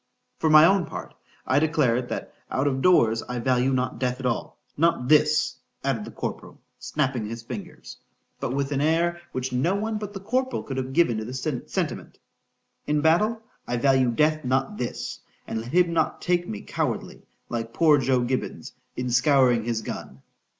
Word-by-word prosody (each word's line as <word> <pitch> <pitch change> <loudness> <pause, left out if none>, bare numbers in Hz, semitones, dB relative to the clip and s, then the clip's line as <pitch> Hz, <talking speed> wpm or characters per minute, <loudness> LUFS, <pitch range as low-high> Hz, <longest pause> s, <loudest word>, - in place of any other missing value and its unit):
For 160 - +2
my 155 0 +9
own 190 -1 +3
part, - - -7 0.3
I 130 - +3
declare 150 -6 +2
it, 125 0 -2
that - - -5 0.2
out 135 - 0
of 135 -2 0
doors, 115 -11 +4
I 125 - -5
value 125 +2 +2
not 130 -1 -1
death 125 0 -1
at 135 - -6
all:—not 135 +3 -1
this.. 150 0 +4 0.3
added - - -1
the - - -8
corporal, - - -6 0.2
snapping 130 -7 -1
his 115 +1 -6
fingers,—but 120 - -9
with 140 0 -1
an 140 -1 0
air 170 +3 +1
which 130 0 -3
no 160 +10 +1
one 215 +1 -2
but 205 -1 -6
the 195 - -6
corporal 255 +6 -1
could 135 - -5
have 130 0 -3
given 135 -9 +3
to 110 - -5
the 125 +3 -6
sentiment.—In 150 +2 -5
battle, 210 +9 +2 0.2
I 120 - -1
value 130 0 +3
death 155 +6 +2
not 130 +11 0
this... 120 - -4 0.3
and 110 - -3
let 120 +2 -8
him 175 -1 +3
not 160 -2 0
take 175 -1 0
me 105 -2 -5
cowardly, - - -3 0.3
like 115 -1 -3
poor 150 +1 +4
Joe 130 -1 +2
Gibbins, 125 +1 -3 0.3
in 125 0 -2
scouring 125 -2 +4
his 115 -2 -2
gun. 65 0 -7
135 Hz, 175 wpm, -25 LUFS, 125-165 Hz, 0.3 s, my